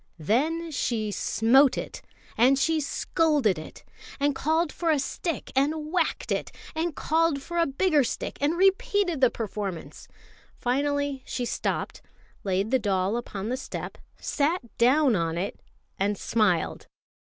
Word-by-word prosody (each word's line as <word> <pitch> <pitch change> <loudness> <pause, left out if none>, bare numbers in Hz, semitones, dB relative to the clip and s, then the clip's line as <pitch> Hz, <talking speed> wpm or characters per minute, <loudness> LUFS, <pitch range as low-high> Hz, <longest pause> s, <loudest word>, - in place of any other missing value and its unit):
Then 310 - 0
she 225 -6 -1
smote 245 +7 +4
it, - - -5 0.3
and 255 +4 +5
she 315 +3 +2
scolded 290 - +1
it, 155 - -11 0.4
and 285 0 +2
called 315 +3 +1
for 335 - -2
a 310 - +4
stick 300 +3 -3
and 300 +3 0
whacked 365 - 0
it, - - -1 0.2
and 320 -1 -2
called 320 -3 +1
for 345 +2 -3
a 335 - +3
bigger 295 +1 +2
stick - - -4
and 300 +4 +1
repeated 385 -3 +2
the 255 - +6
performance. 205 -6 -5 0.5
Finally 285 +2 0
she 245 - -2
stopped, - - -3 0.4
laid 195 +3 0
the 260 - +4
doll 195 -1 0
upon 215 -3 -4
the 255 - -1
step, - - -6 0.2
sat 290 -4 -1
down 260 +1 +4
on 165 -2 -1
it, 190 +3 -3 0.4
and 200 +1 +1
smiled. 195 -8 0
270 Hz, 145 wpm, -26 LUFS, 215-315 Hz, 0.5 s, the